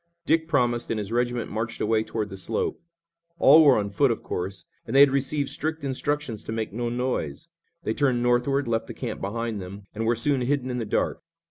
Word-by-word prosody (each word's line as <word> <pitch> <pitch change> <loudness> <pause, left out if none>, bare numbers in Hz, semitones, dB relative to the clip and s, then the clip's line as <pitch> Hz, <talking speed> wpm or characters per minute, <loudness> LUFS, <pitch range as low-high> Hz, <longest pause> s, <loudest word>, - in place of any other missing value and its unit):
Dick 160 0 +2
promised 120 -6 +1
and 115 - 0
his 105 0 -4
regiment 120 0 -1
marched 110 +2 -3
away 110 0 +2
toward 110 -2 -3
the 95 - -7
slope. 95 - -2 0.6
All 155 +1 +8
were 140 -4 +6
on 100 -1 -1
foot, 140 +7 +3
of 115 - -2
course, 95 +1 -4 0.2
and - - -3
they - - +7
had 140 -1 +7
received 140 +1 0
strict 155 +1 -3
instructions 140 -3 -2
to - - -5
make 110 -2 -3
no 120 +1 -2
noise. 120 - -3 0.3
They 110 - -1
turned 125 -2 +1
northward, 125 +3 +2
left 115 -1 -1
the - - -8
camp - - -5
behind 110 +1 -3
them, 100 +2 -8
and 110 +1 -2
were 120 - +3
soon 135 +3 +1
hidden 130 0 0
in 125 - -2
the 115 - -2
dark. - - -1
120 Hz, 215 wpm, -25 LUFS, 110-135 Hz, 0.6 s, All